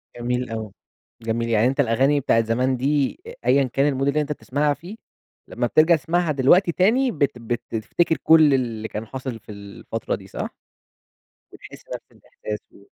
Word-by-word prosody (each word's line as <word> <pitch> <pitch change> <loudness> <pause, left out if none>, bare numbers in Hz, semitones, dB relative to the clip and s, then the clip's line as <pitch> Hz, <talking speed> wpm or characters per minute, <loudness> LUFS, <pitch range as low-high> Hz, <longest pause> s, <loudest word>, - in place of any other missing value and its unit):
جميل 125 +1 -2
أوي، 110 -2 -5 0.5
جميل. 115 +1 -2
يعني 115 +1 +3
أنت 135 +3 -2
الأغاني 135 +3 +3
بتاعة 115 -4 +2
زمان 125 +3 0
دي 140 - 0
أ 470 - -8
أيًا 140 - +4
كان 135 -1 +1
الmood 135 - 0
اللي 145 +2 +2
أنت 150 0 -4
تسمَعها 145 0 0
فيه 180 +9 -10 0.5
لمّا - - -2
بترجَع 160 +2 +5
تسمَعها 165 +3 0
دلوقتي 150 +7 +4
تاني 235 +10 +2
بت 145 -6 +1
بتفتكَر 120 +7 -1
كلّ 160 -3 +6
اللي 115 -4 -1
كان 110 +1 -6
حاصل 130 -1 -6
في 105 - -13
الفترة 100 -1 -5
دي - - -12
صح؟ - - -5 1.0
وتحس - - -13
نفْس - - -12
الإحساس 105 0 -8
و 100 - -19
135 Hz, 165 wpm, -23 LUFS, 115-150 Hz, 1.0 s, كلّ